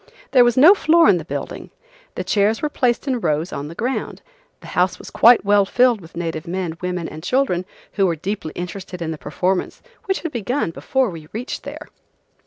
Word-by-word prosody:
There 255 -3 +7
was 240 0 +2
no 310 +9 +9
floor 335 -3 +4
in 185 - +5
the - - -6
building. - - -6 0.5
The - - -3
chairs 215 +4 +1
were 300 - +1
placed 250 -1 0
in 255 -3 0
rows 160 -2 -1
on 140 +1 -4
the 165 - -9
ground. 250 +7 -3 0.4
the - - -11
house - - +1
was - - -11
quite 235 -3 +6
well 205 0 +5
filled 245 +2 +2
with 165 0 -13
native 165 -1 -4
men, 175 -2 -3
women 180 -2 -3
and 155 - -9
children 185 -3 0 0.3
who 195 -2 +2
were 170 - 0
deeply 180 0 -4
interested 180 +1 -6
in 165 -1 -3
the 155 - -6
performance 180 +7 -2 0.2
which 385 -2 -1
had 330 - -4
begun 245 -3 -2
before 260 +6 0
we 160 -3 -10
reached 240 +4 -5
there. - - -9
195 Hz, 200 wpm, -20 LUFS, 170-250 Hz, 0.5 s, no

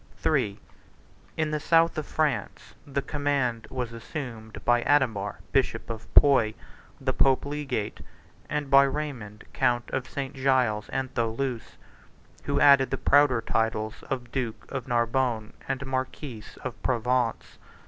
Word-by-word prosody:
49 135 -9 +1
III. - - -23 0.8
In 155 -1 0
the 150 - 0
south 165 +2 +3
of 155 -1 -4
France, 155 -3 -2
the 140 0 -2
command 140 -6 -1
was 125 -3 -4
assumed 115 -2 -7
by 120 0 +4
Adhemar 120 -8 +1
bishop 125 -4 0
of 115 0 -8
Puy, 115 -7 +6 0.4
the 130 -1 -1
pope 135 +1 +3
egate, 135 -8 -3 0.5
and 145 -2 -2
by 135 0 +9
Raymond 135 -7 -3
count 120 -1 +1
of 130 -1 -3
St. 135 -1 -4
Giles 130 -6 +1
and 130 0 -3
Thoulouse 120 +1 -2 0.7
who 140 0 +1
added 140 -2 +6
the 135 - -1
prouder 140 -5 +4
titles 110 -1 -1
of 125 -3 -4
duke 125 -5 -3
of 135 -3 -4
Narbonne 120 -2 0 0.2
and 135 +1 -2
marquis 130 -3 -4 0.2
of 130 -2 -6
Provence. 125 -1 0
130 Hz, 140 wpm, -27 LUFS, 115-140 Hz, 0.8 s, by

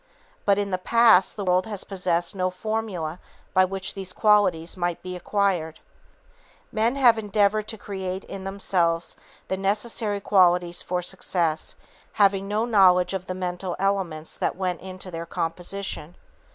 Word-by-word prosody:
But 200 -1 +4
in 200 -1 -1
the 185 - 0
past 225 -2 +4
the 205 - -4
world 185 +2 +2
has 205 -3 -4
possessed 180 -2 -1
no 185 -1 0
formula 185 -4 -3 0.3
by 185 0 +5
which 190 0 -3
these 190 -2 -6
qualities 200 -7 +3
might 175 -2 -2
be 185 0 -5
acquired. 180 -4 -1 0.9
Men 225 +4 +1
have 240 -5 +5
endeavored 210 0 +1
to 220 - -5
create 190 -2 -5
in 195 -1 -8
themselves 180 -4 0 0.3
the 190 - -2
necessary 205 +1 -1
qualities 180 -3 +3
for 180 0 -2
success, 170 -4 0 0.4
having 195 -1 +3
no 210 +3 0
knowledge 185 -5 +4
of 185 -1 -4
the 185 - -3
mental 180 0 -3
elements 185 -5 -1
that - - 0
went 180 -2 -2
into 185 0 -7
their 165 0 -6
composition. 175 0 -4
190 Hz, 150 wpm, -25 LUFS, 180-200 Hz, 0.9 s, by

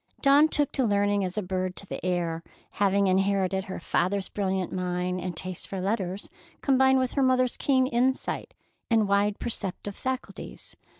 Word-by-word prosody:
Dawn 285 +2 +6
took 295 -3 +1
to 265 - 0
learning 205 -2 +2
as 185 +2 -4
a 210 - 0
bird 185 0 -2
to - - -7
the - - -7
air, 175 -2 -1 0.3
having 200 0 +2
inherited 190 0 +1
her 190 - -6
father's 190 +3 0
brilliant 190 -3 -2
mind 180 0 -2
and 180 -3 -5
taste 185 0 -3
for 195 - -4
letters, 195 -1 -2 0.3
combined 265 -1 +4
with 255 -1 0
her 280 - +1
mother's 255 -1 +3
keen 260 -2 +2
insight 255 +1 -1 0.3
and 220 -3 +3
wide 200 +1 +2
perceptive 200 -3 -4
faculties. 260 0 -6
200 Hz, 165 wpm, -27 LUFS, 185-250 Hz, 0.3 s, Dawn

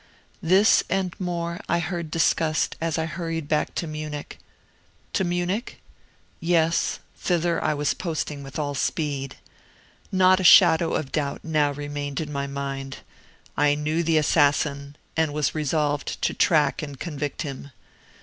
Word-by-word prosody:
This 190 +5 +5
and 190 -2 0
more 170 -2 -3
I - - +3
heard 170 -1 -3
discussed 160 -1 +1
as 165 -1 -1
I 160 - 0
hurried 165 -1 -4
back 150 0 0
to - - -2
Munich. 155 -2 -6 0.7
To - - +1
Munich? 175 +5 -2 0.6
Yes; 165 -1 +1 0.2
thither 175 -1 0
I 150 - +1
was 145 0 0
posting 155 -4 -4
with 135 0 -8
all 145 -2 -2
speed. 140 -2 -2 0.8
Not 185 0 +5
a - - -2
shadow 170 -2 +7
of 140 -4 -3
doubt 140 -2 -2
now 150 -2 +2
remained 145 -1 -4
in 155 -2 -4
my 140 -1 -2
mind. 135 -1 -5 0.6
I 145 0 +3
knew 155 +3 -1
the 165 -1 +2
assassin, 145 -2 +2 0.2
and 160 -2 +1
was 150 -1 0
resolved 150 -1 -1
to - - +1
track - - +2
and 145 -3 -7
convict 150 -2 -4
him. 140 -1 -7
155 Hz, 145 wpm, -24 LUFS, 145-170 Hz, 0.8 s, shadow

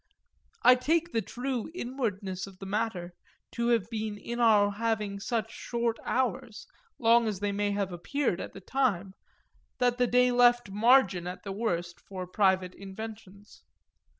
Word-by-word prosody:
I 250 - +9
take 325 +7 +1
the 225 - 0
true 245 +4 -4
inwardness 205 - -3
of 195 -1 -13
the 195 - -9
matter 195 -4 -2 0.4
to 235 0 -1
have 230 -4 +2
been 215 -2 -3
in 235 +3 -5
our 210 -3 +5
having 210 -2 -2
such 225 +1 -2
short 235 -1 -2
hours, 235 -3 -2 0.3
long 230 -1 +4
as 205 -3 -2
they 205 0 -1
may 205 +1 0
have 200 -2 -1
appeared 180 +3 -1
at - - -7
the 195 - -10
time, 200 -6 0 0.6
that 245 -1 +1
the 245 - +3
day 250 +1 +4
left 245 -3 +4
margin 210 -5 +4
at 180 +1 -7
the 200 - -5
worst 175 -5 -2
for 185 -2 -7
private 185 -1 +1
inventions. 200 0 -10
215 Hz, 155 wpm, -29 LUFS, 195-240 Hz, 0.6 s, I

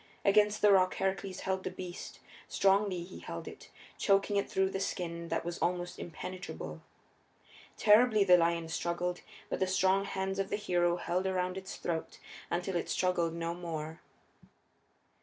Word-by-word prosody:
Against 210 +1 +4
the 210 - +7
rock 185 -1 +4
Heracles 190 0 -2
held 190 0 -1
the - - -2
beast; 180 -1 -8 0.3
strongly 195 -2 +2
he 180 +2 -10
held - - -7
it, - - -10 0.3
choking 200 +1 +3
it 200 - +1
through 190 0 +1
the 195 - -2
skin 170 -3 -3
that - - -2
was 175 0 -4
almost 175 0 -1
impenetrable. 155 - -7 1.0
Terribly 215 0 +6
the 180 -2 +7
lion 170 -1 +2
struggled; 175 +2 -2 0.3
but - - -3
the 190 - +2
strong 190 +1 +3
hands 190 0 -2
of 195 0 -1
the - - 0
hero 175 -4 +1
held 180 +2 -1
around 185 -1 -1
its 190 0 -6
throat 165 -2 -3 0.3
until 180 +2 -2
it 170 - -1
struggled 175 -3 +1
no 170 0 -2
more. 160 -2 -5
185 Hz, 160 wpm, -32 LUFS, 170-195 Hz, 1.0 s, the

